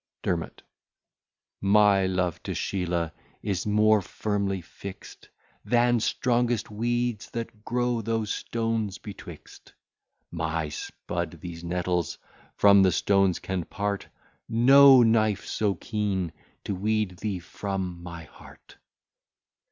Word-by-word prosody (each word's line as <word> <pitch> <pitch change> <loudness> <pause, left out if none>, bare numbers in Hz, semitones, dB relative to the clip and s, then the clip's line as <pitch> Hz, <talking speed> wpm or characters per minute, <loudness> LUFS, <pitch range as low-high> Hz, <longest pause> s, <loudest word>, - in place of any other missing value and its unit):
DERMOT 85 -2 -3 1.0
My 100 -1 +4
love 90 -2 -1
to - - -4
Sheelah 85 -4 -1 0.3
is 100 -1 -2
more 105 0 +4
firmly 100 0 -2
fixt, 95 +2 -11 0.3
Than 120 0 +3
strongest 120 -1 0
weeds 120 +1 -1
that 115 -2 -6
grow 120 0 0
those 110 -1 -1
stones 115 -3 -2
betwixt; 105 - -11 0.6
My 80 -2 -2
spud 85 +2 -5
these 85 0 -8
nettles 90 -2 -1 0.4
from 100 -1 +6
the 95 -1 +5
stones 95 0 +2
can 95 -2 -3
part; 100 +3 -3 0.4
No 135 +2 +8
knife 110 -3 +2
so 105 -3 0
keen 95 -4 -2 0.3
to - - -3
weed 105 -1 -1
thee 100 -1 -3
from 90 0 -5
my 85 -1 -8
heart. 75 - -16
100 Hz, 110 wpm, -26 LUFS, 90-110 Hz, 1.0 s, No